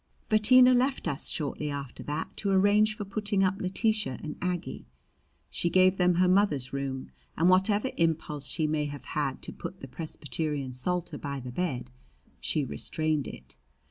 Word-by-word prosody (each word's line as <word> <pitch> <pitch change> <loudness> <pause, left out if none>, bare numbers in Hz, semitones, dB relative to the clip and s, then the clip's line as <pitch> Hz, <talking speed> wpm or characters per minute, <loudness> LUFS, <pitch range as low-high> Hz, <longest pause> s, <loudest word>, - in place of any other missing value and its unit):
Bettina 250 +4 +6
left 255 -3 +1
us 140 -5 -2
shortly 150 0 -2
after 140 -3 -6
that 145 +1 -4
to 200 - 0
arrange 205 +2 +4
for 205 - -4
putting 205 0 0
up 190 +1 0
Letitia 215 - 0
and 150 -1 -5
Aggie. 180 -1 -3 0.6
She 170 - +1
gave 185 +2 +4
them 180 -1 +3
her 180 +1 +4
mother's 180 -10 +2
room, 135 -1 -4 0.3
and 170 +3 +4
whatever 205 +6 +3
impulse 160 -3 0
she 160 - 0
may 150 -1 0
have 145 -2 -7
had 140 -3 -2
to - - -5
put 180 +2 -7
the 135 - -8
Presbyterian 150 -1 -3
Psalter 170 +4 -2
by 140 -1 -4
the 125 -1 -7
bed, 130 - -3 0.5
she 150 -3 +1
restrained 155 +3 -2
it. 65 -1 -11
170 Hz, 165 wpm, -28 LUFS, 145-195 Hz, 0.6 s, Bettina